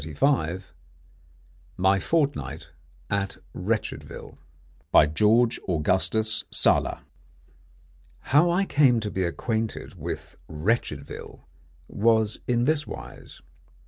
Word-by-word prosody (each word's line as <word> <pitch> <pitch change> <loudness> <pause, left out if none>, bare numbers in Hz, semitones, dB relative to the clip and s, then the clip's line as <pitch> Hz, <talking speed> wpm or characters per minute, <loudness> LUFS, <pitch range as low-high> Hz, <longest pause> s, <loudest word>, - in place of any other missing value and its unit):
_) 85 - 0 1.1
MY 95 +1 +3
FORTNIGHT 135 - -1 0.4
AT 100 -1 -1 0.2
WRETCHEDVILLE. - - -4 0.7
GEORGE 115 +6 +3
AUGUSTUS 95 +6 +1
SALA. - - +2 1.2
How 150 +6 +4
I 180 +3 +2
came 135 -8 +4
to 105 -2 -4
be 95 - -1
acquainted 110 +5 -3
with - - -6
Wretchedville 75 - -3 0.5
was 110 0 +2
in 120 -1 +2
this 150 +1 +1
wise. - - -10
110 Hz, 85 wpm, -25 LUFS, 90-125 Hz, 1.2 s, How